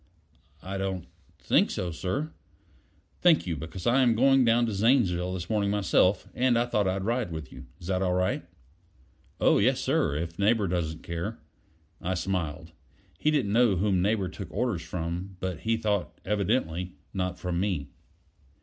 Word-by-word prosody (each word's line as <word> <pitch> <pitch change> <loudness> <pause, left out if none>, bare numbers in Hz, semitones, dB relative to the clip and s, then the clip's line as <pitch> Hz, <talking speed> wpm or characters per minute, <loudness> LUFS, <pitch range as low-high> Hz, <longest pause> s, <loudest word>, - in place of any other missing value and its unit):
"I 95 +1 -4
don't 95 -2 -2 0.3
think - - +3
so, 90 -1 -3
sir." 135 - -3 0.9
"Thank 175 -3 +5
you; 85 -3 -2
because 80 +4 -7
I 125 +3 +4
am 120 -3 +4
going 135 +2 +5
down 120 0 +4
to 110 - -2
Zanesville 95 -5 +2
this 90 -1 -5
morning 105 -2 +1
myself, 100 -1 +2
and 125 -1 +2
I 120 - +2
thought 105 -5 +1
I'd 95 +1 -1
ride 115 -2 -1
with 80 -5 -6
you. 65 0 -11
Is 85 - -10
it 95 -1 0
all 90 -1 +1
right?" 90 -2 0 1.0
"Oh, - - +4
yes, 130 +6 +3
sir 135 - +1
if 85 +3 -4
Neighbor 105 0 +3
doesn't 80 -2 -2
care." 85 +7 -4 0.6
I 90 +1 -1
smiled: 85 -4 -3 0.5
he 155 - +2
didn't 135 -10 +1
know 115 -3 +4
whom 95 0 +1
Neighbor 100 0 +1
took 95 0 -8
orders 110 -5 -1
from; 85 +3 -5
but 90 -3 -3
he 115 +5 0
thought, 105 -4 -1
evidently, 95 -4 0 0.2
not 90 -1 -2
from 90 -1 -2
me. 90 -8 -2
95 Hz, 165 wpm, -28 LUFS, 90-115 Hz, 1.0 s, Thank